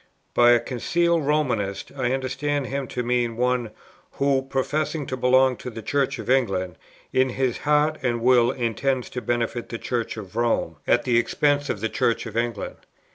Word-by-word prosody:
"By 120 Hz, 0 st, +6 dB
a 120 Hz, -, +4 dB
'concealed 165 Hz, +6 st, 0 dB
Romanist' 120 Hz, -10 st, 0 dB
I 125 Hz, -, 0 dB
understand 135 Hz, +2 st, -1 dB
him 135 Hz, 0 st, -3 dB
to 125 Hz, -, -3 dB
mean 120 Hz, -1 st, 0 dB
one, 125 Hz, -2 st, +1 dB, 0.4 s
who, 140 Hz, -1 st, +2 dB
professing 145 Hz, +3 st, -2 dB
to 130 Hz, -, -3 dB
belong 130 Hz, 0 st, +3 dB
to -, -, -7 dB
the 115 Hz, -2 st, -8 dB
Church 140 Hz, +3 st, 0 dB
of -, -, -7 dB
England, 95 Hz, -9 st, +1 dB, 0.3 s
in 130 Hz, 0 st, +3 dB
his 130 Hz, -1 st, -1 dB
heart 150 Hz, +1 st, +2 dB
and 120 Hz, -3 st, 0 dB
will 120 Hz, 0 st, +4 dB
intends 125 Hz, +1 st, -1 dB
to 125 Hz, -, -4 dB
benefit 120 Hz, 0 st, -2 dB
the 115 Hz, -, -4 dB
Church 115 Hz, -1 st, -3 dB
of 105 Hz, -1 st, -9 dB
Rome, 120 Hz, 0 st, 0 dB
at -, -, +3 dB
the 120 Hz, -2 st, +3 dB
expense 145 Hz, +4 st, +1 dB
of 100 Hz, -, -2 dB
the 115 Hz, -, +1 dB
Church 115 Hz, -, 0 dB
of 110 Hz, -1 st, -8 dB
England. 115 Hz, -3 st, -2 dB
125 Hz, 180 wpm, -24 LUFS, 115-135 Hz, 0.4 s, By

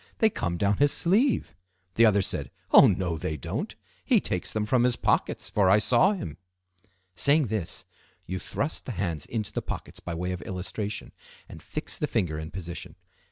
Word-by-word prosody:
They 220 Hz, -1 st, +4 dB
come 85 Hz, -, -2 dB
down 100 Hz, +2 st, +2 dB
his 145 Hz, 0 st, +4 dB
sleeve.' 205 Hz, -, +2 dB, 0.4 s
The 115 Hz, 0 st, +6 dB
other 100 Hz, -2 st, +3 dB
said, -, -, -2 dB, 0.2 s
'Oh! -, -, +9 dB
no, 85 Hz, -4 st, 0 dB
they 80 Hz, -2 st, -3 dB
don't. 65 Hz, -, -4 dB, 0.3 s
He -, -, +4 dB
takes -, -, -2 dB
them 110 Hz, -1 st, -1 dB
from 120 Hz, +2 st, +2 dB
his 125 Hz, -1 st, +3 dB
pockets, -, -, 0 dB
for 100 Hz, -3 st, +3 dB
I 100 Hz, -, +7 dB
saw 125 Hz, -, +4 dB
him.'" 80 Hz, -, -6 dB, 0.8 s
Saying 140 Hz, -, +4 dB
this, 105 Hz, -6 st, -3 dB, 0.4 s
you 95 Hz, +1 st, -4 dB
thrust 140 Hz, -, -3 dB
the 125 Hz, -, -3 dB
hands 85 Hz, -9 st, -2 dB
into 110 Hz, -3 st, -3 dB
the -, -, -1 dB
pockets -, -, -7 dB
by 85 Hz, -, -5 dB
way 90 Hz, +2 st, -2 dB
of 90 Hz, -, -4 dB
illustration, 100 Hz, +2 st, -5 dB, 0.4 s
and -, -, -11 dB
fix -, -, -6 dB
the -, -, 0 dB
finger 80 Hz, -4 st, -1 dB
in 80 Hz, 0 st, -6 dB
position. 85 Hz, -1 st, -7 dB
100 Hz, 185 wpm, -27 LUFS, 85-120 Hz, 0.8 s, Oh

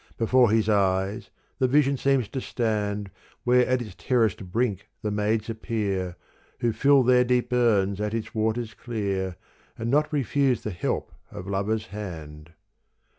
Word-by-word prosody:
Before 120 Hz, +1 st, +4 dB
his 110 Hz, 0 st, +2 dB
eyes 100 Hz, +1 st, +1 dB, 0.3 s
the 130 Hz, -, +3 dB
vision 140 Hz, +1 st, +3 dB
seems 135 Hz, -3 st, +1 dB
to 135 Hz, -, -4 dB
stand 105 Hz, -5 st, -2 dB, 0.3 s
Where 125 Hz, 0 st, +4 dB
at 130 Hz, -1 st, +1 dB
its 110 Hz, -, -10 dB
terraced 115 Hz, -5 st, +1 dB
brink 110 Hz, -3 st, -1 dB, 0.2 s
the 105 Hz, -, -1 dB
maids 105 Hz, +1 st, 0 dB
appear 100 Hz, -5 st, -2 dB, 0.5 s
Who 120 Hz, -2 st, +1 dB
fill 140 Hz, +2 st, +4 dB
their 125 Hz, 0 st, +5 dB
deep 125 Hz, 0 st, 0 dB
urns 105 Hz, -5 st, +2 dB
at 105 Hz, +1 st, -1 dB
its 115 Hz, -, -4 dB
waters 110 Hz, +1 st, -1 dB
clear 100 Hz, -6 st, -3 dB, 0.4 s
And 115 Hz, +1 st, -2 dB
not 150 Hz, +2 st, +2 dB
refuse 135 Hz, -3 st, +1 dB
the 105 Hz, -, -3 dB
help 85 Hz, -, -2 dB, 0.2 s
of 90 Hz, -, -8 dB
lover's 100 Hz, +3 st, -1 dB
hand. 85 Hz, -7 st, -8 dB
110 Hz, 150 wpm, -26 LUFS, 100-125 Hz, 0.5 s, their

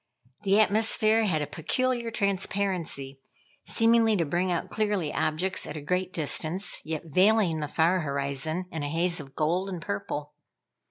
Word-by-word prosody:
The 200 Hz, 0 st, +3 dB
atmosphere 220 Hz, +1 st, +3 dB
had 160 Hz, -7 st, +1 dB
a -, -, -2 dB
peculiar 240 Hz, -, -1 dB
transparency, 190 Hz, -9 st, -2 dB, 0.5 s
seemingly 225 Hz, -1 st, +4 dB
to 170 Hz, -4 st, +1 dB
bring 175 Hz, +5 st, 0 dB
out 170 Hz, -, -2 dB
clearly 205 Hz, -8 st, -1 dB
objects 180 Hz, +5 st, -1 dB
at 155 Hz, -, -6 dB
a -, -, -4 dB
great 180 Hz, +5 st, -1 dB
distance, 165 Hz, +3 st, 0 dB
yet 155 Hz, -1 st, -4 dB
veiling 185 Hz, +1 st, +3 dB
the 150 Hz, -, -2 dB
far 165 Hz, +5 st, +2 dB
horizon 140 Hz, +3 st, -2 dB
in 160 Hz, -, -4 dB
a 145 Hz, -, -3 dB
haze 170 Hz, +2 st, 0 dB
of 135 Hz, -2 st, -11 dB
gold 175 Hz, +5 st, 0 dB
and 180 Hz, -3 st, -4 dB
purple. 145 Hz, +3 st, -4 dB
175 Hz, 155 wpm, -27 LUFS, 155-200 Hz, 0.5 s, seemingly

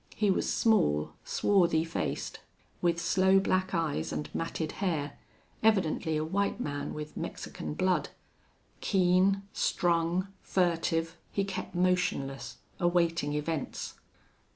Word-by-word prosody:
He 210 Hz, -2 st, +3 dB
was -, -, 0 dB
small, 75 Hz, -, +2 dB
swarthy 175 Hz, -5 st, +3 dB
faced, 165 Hz, 0 st, -3 dB, 0.4 s
with 170 Hz, -1 st, +2 dB
sloe 190 Hz, +2 st, +4 dB
black 185 Hz, -1 st, +1 dB
eyes 165 Hz, -3 st, -1 dB
and 150 Hz, -, -4 dB
matted 165 Hz, -1 st, -2 dB
hair, 150 Hz, -7 st, -1 dB, 0.4 s
evidently 175 Hz, -7 st, +2 dB
a 155 Hz, -, 0 dB
white 200 Hz, +6 st, 0 dB
man 145 Hz, -10 st, -3 dB
with 150 Hz, 0 st, -6 dB
Mexican -, -, -5 dB
blood. 185 Hz, +1 st, +1 dB, 0.7 s
Keen, 190 Hz, +1 st, +3 dB
strung, 175 Hz, +2 st, +1 dB
furtive, 165 Hz, -2 st, 0 dB
he 200 Hz, -, 0 dB
kept 195 Hz, -2 st, -5 dB
motionless, 140 Hz, -8 st, 0 dB, 0.2 s
awaiting 170 Hz, -4 st, +2 dB
events. 150 Hz, 0 st, -3 dB
170 Hz, 110 wpm, -30 LUFS, 160-190 Hz, 0.7 s, sloe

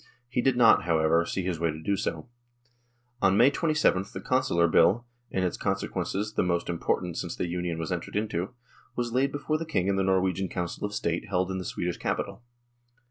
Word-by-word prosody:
He 120 Hz, 0 st, 0 dB
did 130 Hz, -1 st, +2 dB
not, 115 Hz, -7 st, +6 dB
however, 85 Hz, 0 st, +3 dB
see 95 Hz, -, -2 dB
his 90 Hz, -3 st, -2 dB
way 85 Hz, 0 st, +1 dB
to 80 Hz, 0 st, -4 dB
do 100 Hz, +5 st, 0 dB
so. 80 Hz, -4 st, -3 dB, 0.9 s
On 95 Hz, 0 st, +4 dB
May 125 Hz, +5 st, +6 dB
2?th 145 Hz, -, +1 dB
the -, -, -5 dB
Consular 130 Hz, -10 st, +2 dB
Bill, 110 Hz, +8 st, +4 dB, 0.2 s
in 95 Hz, -, -1 dB
its 90 Hz, -, -1 dB
consequences 95 Hz, +1 st, -2 dB
the -, -, +1 dB
most 85 Hz, -1 st, 0 dB
impor 85 Hz, -1 st, 0 dB
tant 90 Hz, -2 st, -5 dB
since -, -, -3 dB
the -, -, -2 dB
Union 90 Hz, -1 st, -2 dB
was 80 Hz, +2 st, -4 dB
entered 90 Hz, -2 st, -4 dB
into, 105 Hz, 0 st, -2 dB, 0.4 s
was 120 Hz, -1 st, -2 dB
laid 135 Hz, +2 st, +2 dB
before 155 Hz, +2 st, -1 dB
the -, -, -2 dB
King 100 Hz, -, -1 dB
in 100 Hz, 0 st, +1 dB
the 95 Hz, -, +2 dB
Norwegian 95 Hz, -1 st, +1 dB
Council 90 Hz, +2 st, -3 dB
of 105 Hz, -, -7 dB
State 85 Hz, +5 st, -1 dB
held 95 Hz, -1 st, 0 dB
in 95 Hz, -, -2 dB
the 90 Hz, -, -6 dB
Swedish 90 Hz, 0 st, -3 dB
capital. -, -, -3 dB
95 Hz, 205 wpm, -28 LUFS, 85-110 Hz, 0.9 s, not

